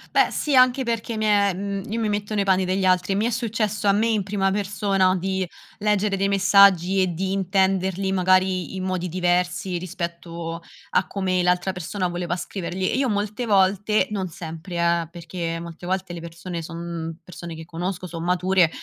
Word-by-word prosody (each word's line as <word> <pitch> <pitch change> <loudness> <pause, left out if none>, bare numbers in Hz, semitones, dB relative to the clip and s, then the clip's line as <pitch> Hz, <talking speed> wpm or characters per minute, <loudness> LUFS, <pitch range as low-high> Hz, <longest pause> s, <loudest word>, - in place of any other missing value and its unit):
Beh - - +5
sì, 290 -3 +1
anche 255 +1 +5
perché 230 -1 -2
mi 215 - -2
è 205 -2 +3
mhmm, 195 +1 -4
io 220 - -2
mi 220 - 0
metto 205 +1 -2
nei 200 - +2
panni 190 -1 +2
degli 190 +1 0
altri 185 +1 +3
e - - -1
mi 210 +3 +1
è - - +1
successo 220 -3 -1
a 200 - +6
me 215 +3 +2
in 220 -3 +1
prima 195 0 0
persona 195 -1 +1
di 190 0 -1 0.3
leggere 210 -1 +1
dei 195 +1 +1
messaggi 195 -2 +5
e 185 -2 +1
di 190 +3 -2
intenderli, 190 0 +1
magari 185 0 +2
in 185 - -4
modi 185 -1 -2
diversi, 180 +1 0
rispetto 170 -1 -5 0.3
a 190 - +1
come 185 -2 0
l'altra 180 +1 +2
persona 180 +1 -3
voleva 175 0 -2
scriverli 185 0 -3
e - - 0
io 270 0 +2
molte 210 +2 -1
volte, 200 0 +3
non 195 -3 -2
sempre 165 +1 -8
eh, 170 -1 +1
perché 170 -1 -5
molte 170 +1 -9
volte 190 0 -2
le 175 - -6
persone 170 +1 -6
son 165 -1 -6
persone 170 -2 -8
che 160 - -8
conosco, 175 +3 -4
son 170 -1 -6
mature 180 -1 +3
185 Hz, 190 wpm, -23 LUFS, 175-200 Hz, 0.3 s, a